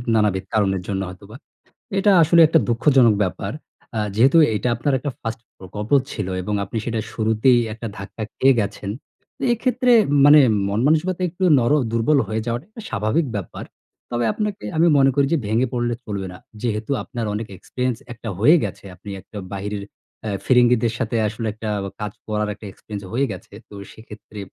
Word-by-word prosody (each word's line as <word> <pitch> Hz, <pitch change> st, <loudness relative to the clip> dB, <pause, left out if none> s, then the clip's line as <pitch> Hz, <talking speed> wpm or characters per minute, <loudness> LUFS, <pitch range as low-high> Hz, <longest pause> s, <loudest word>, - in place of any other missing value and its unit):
নানাবিধ 105 Hz, -3 st, +1 dB
কারণের 95 Hz, -3 st, +1 dB
জন্য 95 Hz, -2 st, -2 dB
হয়তোবা। 100 Hz, +4 st, -12 dB, 0.6 s
এটা 205 Hz, +1 st, +4 dB
আসলে 170 Hz, +2 st, +5 dB
একটা 160 Hz, +1 st, +4 dB
দুঃখজনক 120 Hz, -1 st, +4 dB
ব্যাপার। 90 Hz, -, -3 dB, 0.5 s
আ -, -, +1 dB, 0.2 s
যেহেতু 135 Hz, +8 st, +5 dB, 0.2 s
এটা 125 Hz, -, -1 dB
আপনার 135 Hz, +5 st, -1 dB
একটা 145 Hz, +3 st, -3 dB
first 115 Hz, 0 st, -5 dB, 0.2 s
প্রকল্প 105 Hz, +3 st, -7 dB, 0.2 s
ছিল 105 Hz, -5 st, -4 dB
এবং 105 Hz, +3 st, -3 dB
আপনি 100 Hz, +4 st, -5 dB
সেটা 115 Hz, -2 st, -2 dB
শুরুতেই 110 Hz, +3 st, +3 dB
একটা 115 Hz, +1 st, -6 dB
ধাক্কা 100 Hz, +2 st, -7 dB
খেয়ে 135 Hz, 0 st, +4 dB
গেছেন। 100 Hz, -1 st, -3 dB, 0.5 s
তো -, -, -7 dB
এক্ষেত্রে 250 Hz, +1 st, +1 dB, 0.3 s
মানে 150 Hz, +1 st, +9 dB, 0.3 s
মনমানসিকতা 155 Hz, -, +1 dB
একটু 185 Hz, +3 st, -6 dB, 0.2 s
নর 120 Hz, +3 st, +1 dB, 0.2 s
দুর্বল 115 Hz, +6 st, +2 dB
হয়ে 110 Hz, 0 st, -2 dB
যাওয়াটা 120 Hz, +7 st, -3 dB, 0.2 s
স্বাভাবিক 110 Hz, +9 st, 0 dB
ব্যাপার। 95 Hz, -, -7 dB, 0.5 s
তবে 120 Hz, 0 st, 0 dB
আপনাকে 210 Hz, -, -3 dB
আমি 170 Hz, +2 st, +5 dB
মনে 135 Hz, -1 st, +5 dB
করি 140 Hz, -, +3 dB
যে, 165 Hz, -, +3 dB
ভেঙে 115 Hz, +5 st, +1 dB
পড়লে 120 Hz, -1 st, 0 dB
চলবে 100 Hz, -3 st, -4 dB
না। 90 Hz, -, -10 dB, 0.2 s
যেহেতু 110 Hz, 0 st, -2 dB
আপনার 120 Hz, -4 st, -5 dB
অনেক 105 Hz, +1 st, -4 dB
experience 125 Hz, +4 st, -3 dB
একটা 115 Hz, -1 st, -7 dB
হয়ে 150 Hz, +11 st, +6 dB
গেছে। -, -, -6 dB
আপনি 100 Hz, +3 st, -12 dB
একটা 105 Hz, -, -12 dB, 0.2 s
বাহিরের 100 Hz, +1 st, -4 dB, 0.4 s
এ 105 Hz, -, -2 dB
ফিরিঙ্গিদের 120 Hz, -2 st, +4 dB
সাথে 115 Hz, +1 st, -1 dB
আসলে 115 Hz, +2 st, -4 dB
একটা 110 Hz, 0 st, -6 dB, 0.3 s
কাজ 105 Hz, -, -3 dB, 0.2 s
করার 105 Hz, -1 st, -1 dB
একটা 105 Hz, -, -13 dB
experience 100 Hz, 0 st, -9 dB
হয়ে 135 Hz, +4 st, +2 dB
গেছে। 95 Hz, +1 st, -10 dB, 0.2 s
তো -, -, -14 dB, 0.2 s
সেক্ষেত্রে 110 Hz, -1 st, -12 dB
115 Hz, 170 wpm, -21 LUFS, 105-135 Hz, 0.6 s, মানে